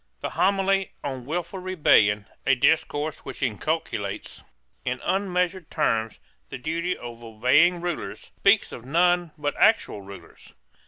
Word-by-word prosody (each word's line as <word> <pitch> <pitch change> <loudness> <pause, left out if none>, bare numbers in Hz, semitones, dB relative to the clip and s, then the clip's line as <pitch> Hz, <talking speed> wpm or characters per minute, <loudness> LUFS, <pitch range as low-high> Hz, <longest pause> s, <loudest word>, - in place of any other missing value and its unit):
The - - -3
Homily 195 0 +1
on 130 -3 -4
Wilful 175 +4 -3
Rebellion, 110 - +3 0.2
a 135 - +4
discourse 150 +2 +1
which - - -7
inculcates, 115 -4 -3 0.4
in 125 0 -2
unmeasured 180 -2 -1
terms, 115 -8 0 0.3
the - - -6
duty 165 +6 -2
of 120 -1 -9
obeying 130 +11 +3
rulers, 175 -2 -5
speaks 200 +2 +4
of 115 - -8
none 175 +5 +2
but 145 -1 -1
actual 220 - +3
rulers. 100 0 -13
155 Hz, 125 wpm, -25 LUFS, 125-180 Hz, 0.4 s, a